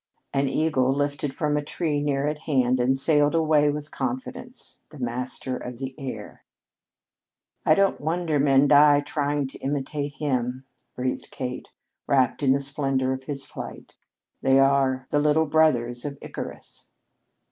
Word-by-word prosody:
An 135 0 +1
eagle 135 -3 +1
lifted 145 0 -1
from 150 +1 -1
a 150 - +1
tree 150 -1 -1
near 140 -1 0
at 150 0 -2
hand 130 -5 +1
and 130 +2 +2
sailed 145 +2 +3
away 155 -2 +3
with 150 +1 -4
confidence, 250 -1 -5
the 150 - -13
master 125 +1 -3
of 125 -1 -7
the 135 +1 -5
air. 135 -2 -7 1.2
"I 155 - +6
don't 195 0 +2
wonder 160 -1 0
men 140 0 +4
die 145 0 +6
trying 145 0 -1
to - - -10
imitate 145 +1 -3
him," 130 -2 -2 0.3
breathed 125 0 -3
Kate, 125 -1 -5 0.4
wrapt 130 -1 +2
in 135 -2 +3
the 135 - +3
splendor 135 -2 0
of 130 0 -7
his 140 -1 -4
flight. - - -9 0.5
"They 135 0 +4
are 135 -1 +3
the 145 - +3
little 150 +2 +3
brothers 125 -6 +2
of 140 -1 -5
Icarus." - - -8
140 Hz, 150 wpm, -25 LUFS, 130-150 Hz, 1.2 s, I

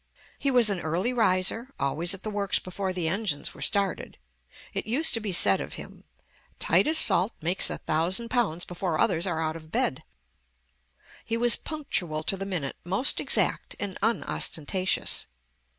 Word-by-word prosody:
He 280 - 0
was 245 -4 +4
an 195 - -1
early 175 +10 -1
riser, 225 +3 0
always 165 +7 +1
at 195 - -15
the 215 - -4
works 200 -1 +1
before 190 +1 -3
the 180 -3 -2
engines 185 -4 -2
were - - -14
started. 200 -3 -1 0.6
It - - -4
used 280 +9 +2
to 230 - +3
be 215 -3 -4
said 175 - +4
of - - -7
him, - - -12 0.5
"Titus 315 +1 +2
Salt 190 - +4
makes 175 +4 +2
a - - -4
thousand 175 +9 -1
pounds 195 -9 0
before 175 -2 -3
others 170 +4 +1
are 170 -3 -2
out 160 0 -2
of 155 -1 -12
bed." 130 - -1 1.2
He 230 - -2
was 240 -1 +6
punctual 180 - -2
to 195 - +1
the 195 0 -6
minute, 165 -8 -4
most 195 +9 +2
exact, - - +2
and 200 -2 -4
unostentatious. 190 -4 -1
190 Hz, 165 wpm, -26 LUFS, 165-225 Hz, 1.2 s, was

